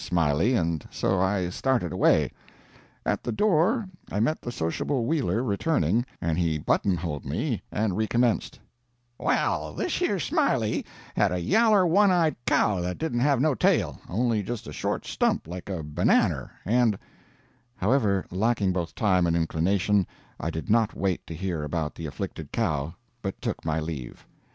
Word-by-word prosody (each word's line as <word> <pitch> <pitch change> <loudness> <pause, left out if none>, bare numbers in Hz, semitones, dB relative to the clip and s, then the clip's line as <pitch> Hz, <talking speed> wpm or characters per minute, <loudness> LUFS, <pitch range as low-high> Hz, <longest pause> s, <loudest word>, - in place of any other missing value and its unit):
Smiley, 85 - +2
and 85 -6 0
so 95 0 0
I 95 -2 +1
started 115 - 0
away. - - +3 0.7
At - - 0
the 120 - -2
door 200 - +2 0.2
I 105 - -1
met 140 +9 +1
the 120 - -5
sociable 115 - -1
Wheeler 120 - 0
returning, 115 - +1
and 85 0 -1
he 80 -3 +1
buttonholed 85 -1 0
me - - -2
and 105 -3 0
recommenced: 115 +2 0 0.6
"Well, - - 0
thish - - -2
yer - - +1
Smiley - - 0 0.3
had - - +3
a 90 - 0
yaller 210 - +4
one 200 +4 +5
eyed 170 -4 +3
cow 100 -4 +2
that 90 +1 -3
didn't 155 -7 -1
have 140 0 +3
no 150 +2 +3
tail, - - +1
only 115 +2 +1
just 115 +3 -5
a - - -8
short - - -2
stump - - 0
like 90 +3 -7
a 90 -5 -3
bannanner, 75 0 +1 0.2
and 115 0 +3 0.4
" 120 +1 -37
However, 100 -3 +1
lacking 100 0 +1
both 85 -2 -3
time 90 -5 +2
and 85 - +1
inclination, 90 +4 +1 0.3
I 80 - -2
did 80 -1 -5
not 115 0 +2
wait 95 -3 -1
to 85 - -6
hear 90 -2 -3
about 75 0 -2
the 80 - -6
afflicted 75 0 -6
cow, 80 - -1 0.3
but 95 -1 -4
took - - -3
my 80 0 0
leave. 75 -6 -6
95 Hz, 160 wpm, -26 LUFS, 85-120 Hz, 0.7 s, one